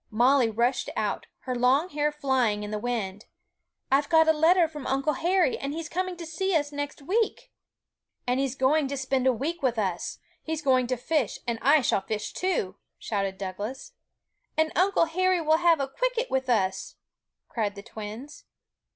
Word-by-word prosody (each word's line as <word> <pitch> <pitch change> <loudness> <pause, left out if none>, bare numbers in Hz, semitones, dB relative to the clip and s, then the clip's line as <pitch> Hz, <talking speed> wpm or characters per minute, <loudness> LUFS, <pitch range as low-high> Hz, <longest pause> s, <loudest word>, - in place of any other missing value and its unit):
Molly 245 +2 +4
rushed 240 +3 0
out, 210 -2 -2
her 255 - -3
long 255 +8 +2
hair 295 -1 0
flying 260 -8 0
in 210 - -6
the 210 - -2
wind: 215 -4 -3 0.7
'I've 280 +2 +3
got 320 -1 +5
a 320 - +6
letter 330 +3 +4
from 300 -3 -8
Uncle 275 +3 +1
Harry, 345 0 +1
and 275 +1 -3
he 320 - -4
is 325 - -6
coming 370 0 -2
to 335 - -7
see 350 +4 -1
us 290 -2 +1
next 290 0 -5
week!' 420 +8 -1 0.7
'And 250 +1 +1
he's 270 -1 -1
going 275 +2 +2
to 280 +1 -4
spend 265 -1 0
a - - +6
week 305 +8 -3
with 250 -4 +1
us; 190 -5 -2 0.2
he's 320 -1 -4
going 255 -3 +3
to 255 0 -1
fish, 265 -2 -1
and 235 -2 -2
I 290 +2 +5
shall 235 - +1
fish 210 +2 -4
too!' 275 - -1 0.2
shouted 195 -3 -2
Douglas. 205 - -6 0.6
'And 315 0 +2
Uncle 370 -1 +3
Harry 370 +2 +1
will 315 -1 +3
have 340 -1 +4 0.2
cwicket - - -1
with 265 -1 0
us!' 195 -6 0 0.5
cried 210 -3 -2
the 200 - -9
twins. 220 +5 -9
275 Hz, 180 wpm, -27 LUFS, 235-320 Hz, 0.7 s, a